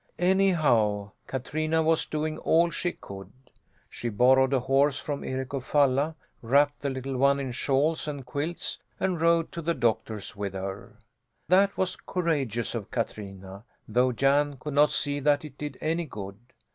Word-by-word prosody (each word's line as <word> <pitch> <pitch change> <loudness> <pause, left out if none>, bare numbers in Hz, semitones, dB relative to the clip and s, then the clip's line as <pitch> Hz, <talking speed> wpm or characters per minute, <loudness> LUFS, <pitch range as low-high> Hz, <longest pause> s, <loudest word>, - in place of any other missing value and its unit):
Anyhow, 150 - +2 0.2
Katrina 155 +5 -1
was 160 0 +2
doing 155 0 -2
all 170 +1 +3
she 175 0 -2
could. 95 -1 -10 0.6
She 120 - -5
borrowed 130 +4 +4
a 135 -2 +2
horse 135 +2 +2
from 145 -1 -4
Eric 130 +1 -4
of 135 -2 -2
Falla, 145 +2 +2 0.3
wrapped 145 +5 +2
the 140 - -1
little 130 0 -4
one 140 +2 +4
in 135 -2 -3
shawls 140 +6 0
and 145 -3 -5
quilts 145 +7 -4 0.2
and 185 -4 -1
rode 165 0 +3
to 170 - -5
the 170 +1 0
doctor's 110 -3 -1
with 100 -1 -4
her. 95 +3 -6 0.5
That 195 +2 +4
was 185 -1 0
courageous 140 - -2
of 115 -4 -5
Katrina 100 -4 -5 0.2
though 125 +3 +2
Jan 140 +3 +2
could 150 +2 -5
not 145 +1 +5
see 145 0 -1
that 145 +1 +2
it 145 -3 -10
did 145 -3 -5
any 165 +2 0
good. 100 -6 -8
140 Hz, 160 wpm, -27 LUFS, 120-155 Hz, 0.6 s, not